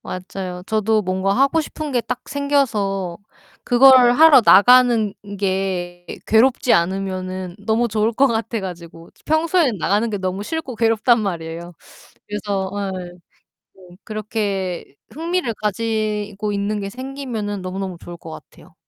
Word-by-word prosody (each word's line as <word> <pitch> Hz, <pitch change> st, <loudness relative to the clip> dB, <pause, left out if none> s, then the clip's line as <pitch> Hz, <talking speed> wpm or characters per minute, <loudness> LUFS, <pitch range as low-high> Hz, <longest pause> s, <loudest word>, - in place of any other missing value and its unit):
맞아요. 185 Hz, 0 st, -6 dB
저도 220 Hz, 0 st, +1 dB
뭔가 190 Hz, +1 st, 0 dB
하고 275 Hz, +7 st, +2 dB
싶은 305 Hz, -1 st, -6 dB
게 245 Hz, -, +1 dB
딱 245 Hz, +1 st, -6 dB
생겨서 215 Hz, -11 st, -1 dB, 0.5 s
그걸 250 Hz, 0 st, +6 dB
하러 300 Hz, -2 st, +7 dB
나가는 235 Hz, 0 st, +6 dB, 0.3 s
게 185 Hz, -2 st, -2 dB, 0.2 s
괴롭지 240 Hz, +2 st, +3 dB
않으면은 185 Hz, 0 st, -1 dB
너무 220 Hz, +3 st, 0 dB
좋을 215 Hz, +2 st, 0 dB
것 275 Hz, +5 st, +3 dB
같아 225 Hz, -1 st, -2 dB
가지고. 170 Hz, -3 st, -9 dB
평소에 315 Hz, -2 st, +2 dB
나가는 210 Hz, +7 st, +1 dB
게 205 Hz, -, -3 dB
너무 190 Hz, +1 st, -3 dB
싫고 300 Hz, -4 st, -5 dB
괴롭단 225 Hz, +1 st, +3 dB
말이에요. 170 Hz, -3 st, -5 dB, 0.6 s
그래서 200 Hz, -2 st, -3 dB, 0.3 s
예 175 Hz, -, -9 dB, 0.7 s
좀 180 Hz, -1 st, -16 dB
그렇게 205 Hz, -6 st, -4 dB, 0.2 s
흥미를 335 Hz, -3 st, -2 dB
가지고 210 Hz, -1 st, -2 dB
있는 205 Hz, +1 st, -2 dB
게 195 Hz, -, -4 dB
생기면은 250 Hz, -6 st, -5 dB
너무너무 185 Hz, -1 st, -5 dB
좋을 175 Hz, -, -9 dB
것 165 Hz, -1 st, -11 dB
같아요. -, -, -14 dB
210 Hz, 285 characters per minute, -20 LUFS, 190-245 Hz, 0.7 s, 하러